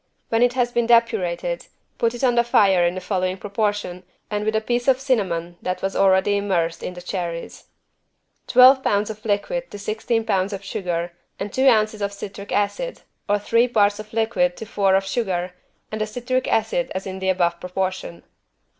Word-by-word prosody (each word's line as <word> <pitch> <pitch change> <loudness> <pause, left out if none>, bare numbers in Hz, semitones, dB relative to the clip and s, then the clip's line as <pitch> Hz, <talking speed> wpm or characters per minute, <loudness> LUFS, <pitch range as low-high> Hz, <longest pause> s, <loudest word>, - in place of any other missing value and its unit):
When 225 0 +1
it 245 0 +4
has 245 -1 0
been 235 -1 0
depurated, 230 - +1 0.3
put 230 +1 +1
it 240 - -7
on 250 -2 +4
the 235 0 +3
fire 195 -6 +4
in 175 +1 +1
the - - -3
following 185 0 -1
proportion 205 -3 -2 0.3
and 210 0 -1
with 215 +1 0
the 220 - +2
piece 240 +2 -1
of 265 -1 +4
cinnamon 185 -10 -1
that 180 0 -3
was 195 - -1
already 195 +1 +3
immersed 175 -5 -1
in 180 - -5
the 180 - -9
cherries: 175 -2 -5 0.8
Twelve 255 +2 +7
pounds 205 -2 +1
of 215 0 -11
liquid 225 - -1
to - - -8
sixteen 220 +2 -2
pounds 195 0 0
of 200 0 -6
sugar 175 -3 -3 0.3
and 200 0 -5
two 265 +1 +4
ounces 215 -2 +2
of 200 0 -2
citric 200 0 -8
acid, - - -1 0.3
or 205 - +3
three 230 +4 +2
parts 205 -3 +2
of 215 0 -9
liquid 220 -6 +1
to 220 - -7
four 200 -3 +2
of 195 0 +1
sugar 185 -4 -2 0.4
and 215 0 -4
the 215 - 0
citric 250 +3 -2
acid 225 +4 0
as 190 - -3
in 190 -1 -5
the 190 0 -1
above 175 -2 +1
proportion. 180 - -4
205 Hz, 190 wpm, -22 LUFS, 185-230 Hz, 0.8 s, Twelve